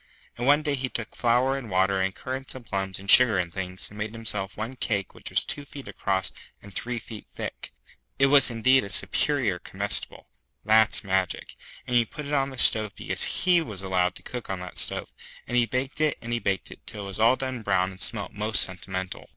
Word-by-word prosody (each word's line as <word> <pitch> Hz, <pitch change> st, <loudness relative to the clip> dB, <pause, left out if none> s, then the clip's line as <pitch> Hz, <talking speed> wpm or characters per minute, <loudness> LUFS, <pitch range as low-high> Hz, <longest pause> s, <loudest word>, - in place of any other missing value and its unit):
And 120 Hz, +2 st, -3 dB
one 145 Hz, +2 st, +5 dB
day 150 Hz, -2 st, 0 dB
he 130 Hz, -1 st, -2 dB
took 115 Hz, -2 st, -5 dB
flour 125 Hz, +3 st, +2 dB
and 130 Hz, -5 st, -6 dB
water 95 Hz, +1 st, +2 dB
and 95 Hz, 0 st, -1 dB
currants 130 Hz, +1 st, -5 dB
and 130 Hz, -2 st, -9 dB
plums 95 Hz, -2 st, -3 dB
and 100 Hz, -, -11 dB
sugar 120 Hz, -2 st, +7 dB
and 85 Hz, -2 st, -2 dB
things, 95 Hz, -1 st, -4 dB
and 105 Hz, -, -11 dB
made 110 Hz, 0 st, -3 dB
himself 105 Hz, -4 st, -3 dB
one 115 Hz, +5 st, -4 dB
cake 100 Hz, -6 st, -2 dB
which -, -, -7 dB
was -, -, +1 dB
two 145 Hz, -, -4 dB
feet 140 Hz, -1 st, -10 dB
across 95 Hz, -2 st, -1 dB, 0.3 s
and 100 Hz, -1 st, -14 dB
three 120 Hz, +5 st, -3 dB
feet 110 Hz, -1 st, -9 dB
thick. -, -, -5 dB, 0.5 s
It 135 Hz, -, +5 dB
was 140 Hz, -1 st, +6 dB
indeed 130 Hz, +3 st, +3 dB
a 100 Hz, -, -7 dB
Superior 100 Hz, +2 st, +1 dB
Comestible -, -, -2 dB, 0.4 s
(that's 110 Hz, +1 st, +4 dB
magic), 95 Hz, -2 st, -1 dB, 0.3 s
and 125 Hz, -, -2 dB
he 120 Hz, -, +6 dB
put 150 Hz, +6 st, -8 dB
it 145 Hz, -, -4 dB
on 135 Hz, -2 st, 0 dB
stove 110 Hz, -3 st, +4 dB
because -, -, -2 dB
he 180 Hz, -2 st, +6 dB
was 105 Hz, -10 st, -4 dB
allowed 90 Hz, -1 st, +1 dB
to -, -, -10 dB
cook 125 Hz, -2 st, -7 dB
on 95 Hz, -2 st, -3 dB
the 90 Hz, -, -7 dB
stove, -, -, -2 dB, 0.3 s
and 125 Hz, -, -4 dB
he 120 Hz, -1 st, +4 dB
baked 130 Hz, +4 st, -3 dB
it 155 Hz, -1 st, +2 dB
and 120 Hz, 0 st, -5 dB
he 120 Hz, -, 0 dB
baked 95 Hz, -4 st, -2 dB
it -, -, -14 dB
till 105 Hz, -1 st, -7 dB
it -, -, -6 dB
was 95 Hz, -, -7 dB
all 115 Hz, +3 st, +5 dB
done 130 Hz, -2 st, -4 dB
brown 95 Hz, -3 st, +1 dB
and 95 Hz, 0 st, -14 dB
smelt 105 Hz, -2 st, -2 dB
most 105 Hz, -1 st, +4 dB
sentimental. 95 Hz, 0 st, -5 dB
110 Hz, 220 wpm, -26 LUFS, 95-130 Hz, 0.5 s, sugar